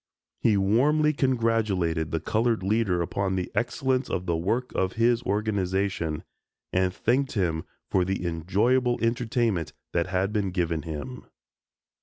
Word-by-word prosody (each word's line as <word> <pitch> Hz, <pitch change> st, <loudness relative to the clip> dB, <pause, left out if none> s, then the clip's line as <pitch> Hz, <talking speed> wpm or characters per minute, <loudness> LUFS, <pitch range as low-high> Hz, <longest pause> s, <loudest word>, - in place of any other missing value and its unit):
He 110 Hz, -3 st, +3 dB
warmly 145 Hz, +10 st, +3 dB
congratulated 110 Hz, -, +1 dB
the 80 Hz, -, -1 dB
colored 110 Hz, +5 st, 0 dB
leader 95 Hz, -3 st, +1 dB
upon 95 Hz, +2 st, -1 dB
the 90 Hz, -1 st, -3 dB
excellence 130 Hz, +2 st, 0 dB
of 90 Hz, -, -2 dB
the 85 Hz, -2 st, 0 dB
work 115 Hz, +10 st, -1 dB
of 95 Hz, 0 st, 0 dB
his 115 Hz, 0 st, +2 dB
organization, 95 Hz, -6 st, -1 dB, 0.5 s
and 95 Hz, 0 st, +2 dB
thanked 130 Hz, +8 st, 0 dB
him 85 Hz, -6 st, 0 dB, 0.3 s
for 95 Hz, -, +3 dB
the 95 Hz, 0 st, -2 dB
enjoyable 105 Hz, +10 st, +1 dB
entertainment 115 Hz, -, 0 dB, 0.2 s
that 85 Hz, +1 st, +1 dB
had 95 Hz, +2 st, 0 dB
been 100 Hz, -3 st, 0 dB
given 85 Hz, -3 st, -1 dB
him. 80 Hz, -, -7 dB
100 Hz, 135 wpm, -26 LUFS, 90-120 Hz, 0.5 s, He